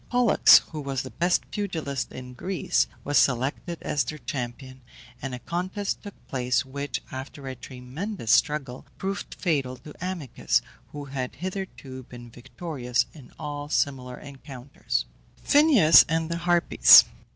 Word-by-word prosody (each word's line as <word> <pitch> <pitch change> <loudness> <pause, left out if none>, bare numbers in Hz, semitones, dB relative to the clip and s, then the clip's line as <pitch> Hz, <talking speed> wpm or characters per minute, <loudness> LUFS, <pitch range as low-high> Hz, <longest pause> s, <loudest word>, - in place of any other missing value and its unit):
Pollux, 245 -3 +6
who 155 -2 -5
was 135 -2 -3
the - - -9
best 175 +1 0
pugilist 160 - -3
in 125 0 -9
Greece, 185 +8 0 0.2
was 145 0 +3
selected 135 +7 0
as 145 - 0
their 155 +5 -6
champion, 130 -1 -6 0.4
and 135 -2 -4
a - - -6
contest 185 - -3
took 205 -2 -10
place, 125 -1 0
which, 140 -1 -5
after 135 +2 -8
a 130 - -4
tremendous 130 - -5
struggle, 140 -3 +1
proved 195 +1 -4
fatal 140 -8 -1
to 145 +4 -12
Amycus, 150 - -1 0.3
who 145 -1 -7
had 130 -2 -5
hitherto 180 -7 -6
been 120 -1 -12
victorious 125 0 -3
in 140 -6 -14
all 145 0 -6
similar 130 -4 -1
encounters. 135 - -5 0.4
PHINEUS 280 - +7
AND 160 +1 -1
THE 170 - -1
HARPIES. 175 0 +7
140 Hz, 140 wpm, -26 LUFS, 125-170 Hz, 0.4 s, PHINEUS